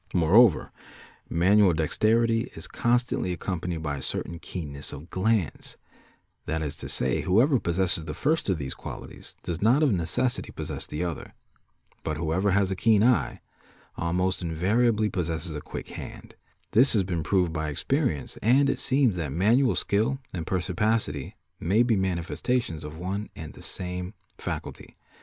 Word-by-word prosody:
Moreover 90 Hz, +4 st, +5 dB, 0.6 s
manual 95 Hz, +2 st, +4 dB
dexterity 115 Hz, +8 st, +2 dB
is -, -, -6 dB
constantly 120 Hz, -6 st, 0 dB
accompanied 90 Hz, -2 st, -3 dB
by 75 Hz, -2 st, -2 dB
a -, -, -6 dB
certain 85 Hz, +4 st, -2 dB
keenness 75 Hz, -6 st, -6 dB
of 75 Hz, +5 st, -10 dB
glance; 100 Hz, -4 st, 0 dB, 0.7 s
that 80 Hz, 0 st, -1 dB
is 75 Hz, -, -3 dB
to -, -, -5 dB
say 65 Hz, 0 st, +2 dB
whoever 120 Hz, +9 st, +4 dB
possesses 85 Hz, -3 st, 0 dB
the 75 Hz, -1 st, -5 dB
first 155 Hz, -, 0 dB
of 95 Hz, -, +2 dB
these 65 Hz, -3 st, -4 dB
qualities -, -, -9 dB
does 85 Hz, -1 st, -4 dB
not 125 Hz, +8 st, +4 dB
of 145 Hz, -, +4 dB
necessity 110 Hz, +9 st, 0 dB
possess -, -, -5 dB
the 75 Hz, +4 st, -3 dB
other, 85 Hz, -3 st, -5 dB, 0.7 s
but 75 Hz, -, -3 dB
whoever 85 Hz, +5 st, 0 dB
has 95 Hz, 0 st, +2 dB
a -, -, 0 dB
keen 105 Hz, +2 st, +4 dB
eye 115 Hz, -, +2 dB, 0.5 s
almost 90 Hz, +3 st, 0 dB
invariably 105 Hz, +7 st, +2 dB
possesses 85 Hz, -3 st, -2 dB
a 75 Hz, -, -5 dB
quick -, -, -7 dB
hand; -, -, -9 dB, 0.4 s
this 125 Hz, +6 st, +5 dB
has 105 Hz, -4 st, +3 dB
been 90 Hz, -3 st, -2 dB
proved 90 Hz, -1 st, +1 dB
by 80 Hz, -1 st, -2 dB
experience 125 Hz, -, -1 dB
and 135 Hz, +5 st, +4 dB
it -, -, -3 dB
seems 130 Hz, -6 st, +2 dB
that 80 Hz, -5 st, -3 dB
manual 115 Hz, -, +3 dB
skill 110 Hz, +7 st, +1 dB, 0.2 s
and 85 Hz, -3 st, -4 dB
perspicacity 90 Hz, -4 st, -1 dB, 0.2 s
may 105 Hz, +7 st, +3 dB
be 120 Hz, -2 st, +2 dB
mani 95 Hz, -3 st, 0 dB
festations 90 Hz, -5 st, -2 dB
of 75 Hz, +1 st, -8 dB
one 95 Hz, +4 st, -4 dB
and 80 Hz, -1 st, -8 dB
the -, -, -13 dB
same 90 Hz, +1 st, -5 dB, 0.2 s
faculty. -, -, -6 dB
95 Hz, 155 wpm, -27 LUFS, 80-115 Hz, 0.7 s, Moreover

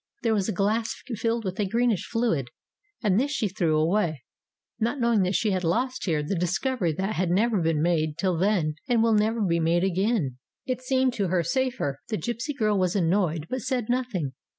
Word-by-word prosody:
There 225 Hz, -2 st, +2 dB
was 205 Hz, -1 st, 0 dB
a -, -, +1 dB
glass 215 Hz, +3 st, 0 dB, 0.2 s
filled 230 Hz, +1 st, -1 dB
with 185 Hz, +1 st, -4 dB
a 205 Hz, -, +2 dB
greenish 230 Hz, -1 st, +1 dB
fluid, 225 Hz, -, 0 dB, 0.5 s
and 205 Hz, -1 st, +3 dB
this 275 Hz, +3 st, +1 dB
she 265 Hz, -7 st, 0 dB
threw 170 Hz, -5 st, 0 dB
away, 160 Hz, -, +1 dB, 0.6 s
not 235 Hz, +5 st, 0 dB
knowing 235 Hz, -3 st, +3 dB
that 185 Hz, +1 st, +1 dB
she 215 Hz, -, +1 dB
had 185 Hz, -1 st, -1 dB
lost 250 Hz, +10 st, 0 dB
here 155 Hz, -5 st, 0 dB
the 150 Hz, -, -2 dB
discovery 180 Hz, +3 st, 0 dB
that 190 Hz, +6 st, -2 dB
had 180 Hz, -1 st, +1 dB
never 210 Hz, +2 st, +2 dB
been 160 Hz, -2 st, +1 dB
made 155 Hz, -3 st, +1 dB
till 185 Hz, 0 st, +1 dB
then 170 Hz, -4 st, +1 dB
and 235 Hz, -2 st, +3 dB
will 230 Hz, -1 st, +3 dB
never 220 Hz, +2 st, +2 dB
be 170 Hz, -3 st, +1 dB
made 165 Hz, +2 st, +2 dB
again. 190 Hz, -, 0 dB, 0.3 s
It 255 Hz, -1 st, -2 dB
seemed 260 Hz, 0 st, +1 dB
to 200 Hz, -5 st, -1 dB
her 175 Hz, -1 st, +1 dB
safer. 250 Hz, -, -1 dB
The 215 Hz, -, -1 dB
gipsy 240 Hz, +6 st, -3 dB
girl 215 Hz, -6 st, +1 dB
was 185 Hz, 0 st, +1 dB
annoyed, 170 Hz, -4 st, +1 dB
but 255 Hz, +5 st, -3 dB
said 245 Hz, -4 st, -2 dB
nothing. 240 Hz, -, -1 dB
200 Hz, 200 wpm, -26 LUFS, 170-235 Hz, 0.6 s, and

